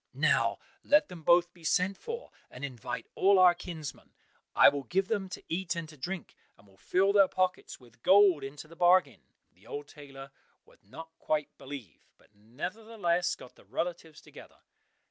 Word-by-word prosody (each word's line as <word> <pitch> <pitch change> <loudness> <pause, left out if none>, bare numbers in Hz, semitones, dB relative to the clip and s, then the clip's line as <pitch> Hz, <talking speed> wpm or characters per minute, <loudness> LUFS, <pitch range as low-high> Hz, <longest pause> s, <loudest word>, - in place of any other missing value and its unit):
Now - - +2 0.3
let 295 +1 +4
them 175 -2 -10
both 175 +2 +4
be 175 - -19
sent 185 +4 +1
for, 470 - -7 0.2
and 130 +3 -7
invite 120 -2 -6
all 195 +1 +4
our 180 -1 +7
kinsmen. 165 -5 -9 0.4
I - - +8
will 140 0 +3
give 190 +1 0
them 200 -4 -1
to - - -8
eat 180 +1 -2
and 165 -1 -5
to 155 - -13
drink, 175 +6 -6 0.2
and 100 - -22
will 100 -1 -22
fill 195 - +2
their 200 -2 +6
pockets 185 0 -2
with 120 -2 -21
gold 190 -4 +5
into 140 +3 -8
the 165 - -15
bargain." 175 -6 +3 0.3
The 95 +5 -23
old 145 0 -6
tailor 135 -2 -12 0.3
would - - -24
not 165 +11 -11
quite 150 -1 -2
believe, 135 - -10
but - - -28
nevertheless 175 - -2
got 125 - -14
the - - -21
relatives 165 - -5
together. - - -15
165 Hz, 175 wpm, -30 LUFS, 135-185 Hz, 0.4 s, I